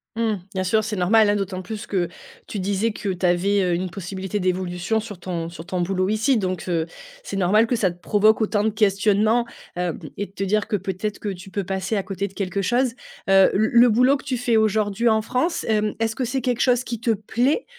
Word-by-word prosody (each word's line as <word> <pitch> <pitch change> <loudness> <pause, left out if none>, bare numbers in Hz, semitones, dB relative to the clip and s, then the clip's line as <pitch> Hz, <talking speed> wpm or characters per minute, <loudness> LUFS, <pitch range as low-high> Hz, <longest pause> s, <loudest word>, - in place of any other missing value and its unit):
Mmh. 225 -1 +1 0.2
Bien 185 0 -1
sûr, 215 +4 +2
c'est 215 0 -3
normal, 210 +4 +4
hein. 205 - +3
D'autant 190 -2 -3
plus, 215 +3 -6
que 180 -4 0 0.4
tu 205 - -5
disais, 200 +4 0
que 205 -1 -5
tu 185 0 -2
avais, 195 +3 +2
heu, 180 -1 +1
une 180 +1 -1
possibilité 190 +2 -4
d'évolution, 185 +3 -1
sur 210 -4 -8
ton 170 -3 -4
sur 170 -1 -10
ton 180 0 -2
boulot, 185 +1 0
ici. 220 +4 +2
Donc, 185 -4 -2
heu, 165 -2 0 0.4
c'est - - -6
normal 205 +5 +4
que 245 - 0
ça 195 -5 +2
te 175 +1 -11
provoque 215 +3 +3
autant 210 -1 +1
de 220 - +2
questionnements, 210 +2 +2 0.3
heum, 175 -2 -2 0.2
et 205 - -3
de - - -24
te 195 - -4
dire 210 +2 +1
que, 220 - 0
peut-être 200 +2 -3
que 210 - -4
tu 190 0 -7
peux 200 0 -3
passer 190 +3 -2
à 195 - -1
côté 195 +1 -3
de 190 - -15
quelque 195 0 -2
chose. 240 +4 +1 0.4
Heu, 195 0 +6
le 220 +2 +2
le 245 - +5
boulot 250 +5 +4
que - - -14
tu 260 -3 -2
fais 240 -1 +1
aujourd'hui 215 +1 +2
en 220 0 +3
France, 260 +10 -1
hem, 215 -1 +1
est-ce 225 -1 0
que 260 - -1
c'est 260 +2 -2
quelque 245 -1 -1
chose 250 -1 +3
qui 235 -3 -5
te 230 - +2
plaît? 240 - 0
205 Hz, 235 wpm, -23 LUFS, 185-220 Hz, 0.4 s, Heu